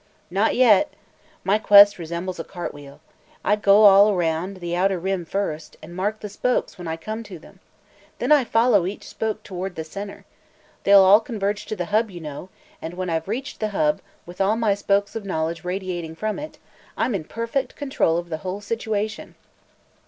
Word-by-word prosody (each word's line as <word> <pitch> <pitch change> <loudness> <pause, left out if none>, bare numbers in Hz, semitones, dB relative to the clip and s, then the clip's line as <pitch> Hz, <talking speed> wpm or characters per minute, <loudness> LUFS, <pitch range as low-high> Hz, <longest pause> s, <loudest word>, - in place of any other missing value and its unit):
"Not 200 +4 +1
yet. 250 +3 +5 0.5
My 200 +3 +2
quest 205 -2 +7
resembles 170 +2 -5
a - - -3
cart 175 0 -6
wheel. 145 -1 -13 0.4
I 210 - +4
go 210 0 +5
all 200 0 +8
around 175 0 -1
the 175 -1 -4
outer 190 +1 +1
rim 185 0 -2
first, 165 -4 -4
and 170 +3 -11
mark 205 +4 -2
the 210 - -5
spokes 245 +5 -1
when 175 -3 -8
I 160 0 -3
come 215 +7 -5
to 205 -5 -10
them. 160 - -17 0.6
Then - - -2
I 295 -3 +6
follow 225 -5 +3
each 200 - -7
spoke 220 -1 -4
toward 185 -1 -6
the 160 - -4
center. 200 +5 -8 0.6
They'll 200 -1 +8
all 195 +3 +7
converge 205 -4 -3
to 215 - -3
the 180 -3 -3
hub, 220 +1 +3
you 180 -3 -9
know, 155 +3 -8 0.3
and 165 +2 -6
when 185 -1 -3
I've 160 +1 -2
reached 250 +7 -4
the 215 - 0
hub, 150 -1 +1 0.2
with 175 +2 -7
all 200 +3 +3
my 225 -3 +2
spokes 200 0 0
of 225 - -4
knowledge 165 -2 -3
radiating 180 -3 -4
from 215 - -3
it, 305 +1 -8 0.4
I'm 250 - 0
in 190 -5 -2
perfect 230 - -3
control 270 - 0
of 175 0 -5
the 160 - -3
whole 185 +4 -5
situation." 220 0 -3
195 Hz, 190 wpm, -23 LUFS, 175-215 Hz, 0.6 s, all